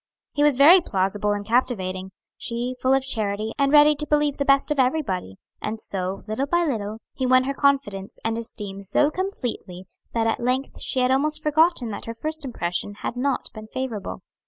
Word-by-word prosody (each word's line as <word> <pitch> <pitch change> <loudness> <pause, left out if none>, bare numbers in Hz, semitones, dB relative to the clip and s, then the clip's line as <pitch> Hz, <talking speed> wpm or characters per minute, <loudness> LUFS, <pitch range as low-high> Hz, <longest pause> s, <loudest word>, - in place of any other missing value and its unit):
He 290 - -1
was 295 -3 +4
very 330 +7 +8
plausible 205 - 0
and 205 0 -2
captivating, 190 -6 0 0.3
she 240 +2 -3
full 260 - +2
of 270 -1 0
charity 215 -3 -1
and 275 0 +3
ready 300 0 +7
to 300 +1 -4
believe 295 -1 +1
the 280 - -1
best 275 +2 +3
of 295 - 0
everybody, 250 - 0 0.3
and 220 +1 -3
so, 190 -2 -3
little 220 +6 -2
by 345 +3 +2
little, 215 -7 -3 0.2
he 260 - -2
won 255 0 +5
her 275 +1 -2
confidence 270 -9 0
and 225 0 0
esteem 210 -4 -6
so 290 +9 +2
completely 245 - -4 0.3
that 225 -1 +1
at 225 - 0
length 255 +3 -2
she 260 - 0
had 250 +1 +2
almost 305 +3 +1
forgotten 305 -5 +3
that 205 - -7
her 230 - -6
first 310 +5 -4
impression 205 -5 -2
had - - -3
not 265 +2 -1
been 215 0 -9
favorable. 225 -5 -5
250 Hz, 190 wpm, -24 LUFS, 205-280 Hz, 0.3 s, very